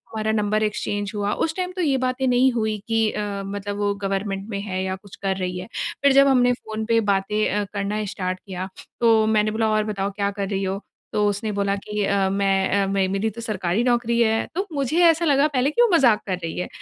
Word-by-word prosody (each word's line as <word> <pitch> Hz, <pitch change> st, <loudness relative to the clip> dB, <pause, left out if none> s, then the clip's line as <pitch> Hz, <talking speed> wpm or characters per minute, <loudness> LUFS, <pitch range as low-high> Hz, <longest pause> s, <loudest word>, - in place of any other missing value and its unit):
हमारा 220 Hz, 0 st, 0 dB
number 215 Hz, 0 st, +1 dB
exchange 205 Hz, -1 st, -2 dB
हुआ। 205 Hz, 0 st, -1 dB
उस 320 Hz, 0 st, -1 dB
टाइम 365 Hz, -1 st, -2 dB
तो 365 Hz, -, -2 dB
ये 280 Hz, -5 st, +2 dB
बातें 255 Hz, +1 st, -1 dB
नहीं 250 Hz, +1 st, +4 dB
हुई 220 Hz, -2 st, -1 dB
कि 225 Hz, -1 st, +2 dB
अ, 200 Hz, -1 st, -3 dB
मतलब 205 Hz, +1 st, -4 dB
वो 205 Hz, 0 st, 0 dB
गवर्नमेंट 195 Hz, 0 st, -2 dB
में 200 Hz, -2 st, -3 dB
है 190 Hz, -2 st, -3 dB
या 190 Hz, 0 st, -2 dB
कुछ 195 Hz, 0 st, -14 dB
कर 190 Hz, -1 st, 0 dB
रही 180 Hz, -1 st, -3 dB
है। 180 Hz, -, -6 dB, 0.4 s
फिर 280 Hz, -, +6 dB
जब 275 Hz, 0 st, +6 dB
हमने 245 Hz, -2 st, +4 dB
फ़ोन 220 Hz, -2 st, -5 dB
पे 230 Hz, 0 st, +3 dB
बातें 210 Hz, +2 st, +1 dB
अ, 205 Hz, +1 st, 0 dB
करना 205 Hz, +1 st, -2 dB
स्टार्ट 185 Hz, -2 st, -3 dB
किया, 185 Hz, -1 st, -5 dB, 0.3 s
तो 225 Hz, -2 st, +5 dB
मैंने 215 Hz, -1 st, +2 dB
बोला, 220 Hz, 0 st, 0 dB
"और 215 Hz, 0 st, +2 dB
बताओ, 200 Hz, -2 st, -2 dB
क्या 200 Hz, 0 st, -1 dB
कर 200 Hz, -1 st, -4 dB
रही 195 Hz, -1 st, -1 dB
हो?" 195 Hz, +2 st, -2 dB, 0.3 s
तो 210 Hz, -, +2 dB
उसने 210 Hz, +2 st, -2 dB
बोला 200 Hz, 0 st, 0 dB
कि 210 Hz, +1 st, -3 dB
अ, 195 Hz, -1 st, +1 dB
"मैं 195 Hz, -1 st, +1 dB
अ, -, -, -1 dB
मे 195 Hz, -1 st, +1 dB
मेरी 195 Hz, +3 st, -1 dB
तो 230 Hz, +3 st, -9 dB
सरकारी 210 Hz, -1 st, -1 dB
नौकरी 235 Hz, -1 st, +1 dB
है।" 225 Hz, 0 st, +2 dB
तो 385 Hz, +3 st, -1 dB
मुझे 285 Hz, +5 st, +1 dB
ऐसा 330 Hz, 0 st, +4 dB
लगा 285 Hz, -1 st, +4 dB
पहले 270 Hz, -2 st, +1 dB
कि 475 Hz, -, +2 dB
वो 480 Hz, -, +6 dB
मज़ाक 245 Hz, -9 st, +5 dB
कर 185 Hz, -, 0 dB
रही 165 Hz, -, -4 dB
है। -, -, -2 dB
210 Hz, 235 wpm, -23 LUFS, 195-235 Hz, 0.4 s, फिर